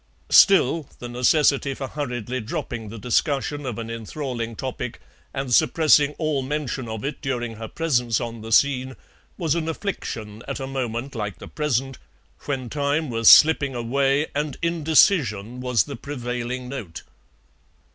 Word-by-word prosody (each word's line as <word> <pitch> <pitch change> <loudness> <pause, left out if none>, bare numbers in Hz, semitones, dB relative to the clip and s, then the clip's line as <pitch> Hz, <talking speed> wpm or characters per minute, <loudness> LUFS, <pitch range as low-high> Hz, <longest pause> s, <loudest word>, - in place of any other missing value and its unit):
Still, 165 -6 +5
the 120 - -7
necessity 135 +3 +2
for 135 -1 -5
hurriedly 125 -4 -4
dropping 110 0 -5
the 115 - -8
discussion 140 +5 -1
of 120 - -4
an 115 -1 -5
enthralling 115 0 -5
topic, 125 -1 -5 0.3
and 135 -2 -3
suppressing 150 +3 +4
all 155 -4 0
mention 135 -3 -3
of 110 +2 -5
it 140 -1 -4
during 120 -4 -3
her 110 0 -6
presence 125 -7 0
on 115 -1 -5
the 110 +1 -8
scene, 130 +1 +3 0.4
was 165 -5 0
an 165 -1 -2
affliction 115 - -5
at 140 - -4
a 135 - -4
moment 130 -1 -4
like 105 -4 -4
the - - -10
present, 135 -3 -2 0.5
when 135 -3 -3
time 145 +2 -1
was 115 -1 +5
slipping 145 -4 +7
away 135 +4 +1
and 145 -1 -2
indecision 150 - +2
was 125 -3 +2
the 140 - -7
prevailing 125 -2 -4
note. 115 -12 -7
130 Hz, 145 wpm, -23 LUFS, 120-145 Hz, 0.5 s, slipping